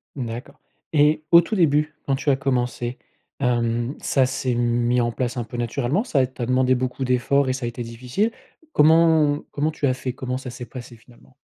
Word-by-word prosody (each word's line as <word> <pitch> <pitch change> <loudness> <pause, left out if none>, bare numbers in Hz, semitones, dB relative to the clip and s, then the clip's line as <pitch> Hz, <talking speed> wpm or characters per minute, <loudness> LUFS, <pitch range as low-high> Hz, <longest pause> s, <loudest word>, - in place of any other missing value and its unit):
Mmh, 130 -4 -3
d'accord. 115 +3 -8 0.3
Et 150 +1 +3
au 170 0 +9
tout 215 +6 -3
début, 150 -4 +2
quand 135 - +1
tu 140 +2 -2
as 140 - +5
commencé, 125 -2 -2 0.4
hem, 120 0 0
ça 135 -2 +2
s'est 130 -1 -2
mis 120 +1 +1
en 120 0 0
place 125 +1 -3
un 120 - -1
peu 115 +2 -8
naturellement? 125 - -1
Ça 140 - +1
t'a 125 -1 -5
demandé 130 +1 +2
beaucoup 130 +1 -2
d'efforts 130 +2 +2
et - - +1
ça 130 -1 -4
a - - -1
été 120 +1 -5
difficile? 125 - -2 0.4
Comment 160 -1 +4
comment 150 +2 -1
tu 150 - -3
as 130 - +3
fait? 130 0 -4
Comment 125 0 -4
ça 130 -1 -7
s'est 120 +1 -8
passé 120 0 -10
finalement? 115 - -21
130 Hz, 205 wpm, -23 LUFS, 120-145 Hz, 0.4 s, au